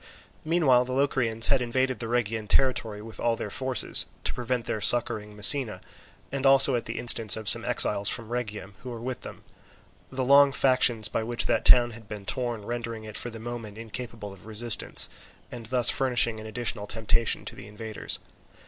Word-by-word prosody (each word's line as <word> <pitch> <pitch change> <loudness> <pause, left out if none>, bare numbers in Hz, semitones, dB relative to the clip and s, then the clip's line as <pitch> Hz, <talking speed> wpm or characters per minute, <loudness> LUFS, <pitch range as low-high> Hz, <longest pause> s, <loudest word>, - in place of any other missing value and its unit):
Meanwhile, 155 -7 +2
the 130 - -6
Locrians 130 -5 +1
had 135 -2 +2
invaded 130 0 -1
the 115 - -5
Rhegian 115 -2 -2
territory 110 -4 0
with 110 0 -12
all 115 -1 0
their 105 - -7
forces, 130 +2 +2 0.2
to - - -2
prevent 125 -1 -3
their 110 - -4
succouring 110 -1 +3
Messina, 110 +2 +6 0.5
and 135 0 -4
also 135 0 +6
at 120 - -3
the - - -6
instance 115 -4 +3
of 110 -2 -7
some - - +3
exiles 100 -1 +2
from 115 -2 -2
Rhegium 105 -5 -6
who 130 - -10
were 120 -2 -7
with 125 +2 -6
them; - - -11 0.7
the 130 -1 -3
long 140 +1 +5
factions 125 -5 +2
by 110 - -3
which 120 +1 -3
that - - -1
town 120 -1 +5
had 115 -1 -13
been 105 -2 -8
torn 120 -2 -4
rendering 115 -1 -6
it 110 -1 -10
for 120 - -2
the 115 - -10
moment 115 -2 -8
incapable 115 -2 -8
of 100 - -17
resistance, 110 +1 -1 0.4
and 120 -3 -9
thus 125 0 +2
furnishing 120 -4 +1
an 110 - -9
additional 110 -2 -4
temptation 115 +1 -1
to - - -7
the - - -12
invaders. 110 +1 -5
115 Hz, 185 wpm, -26 LUFS, 110-125 Hz, 0.7 s, Messina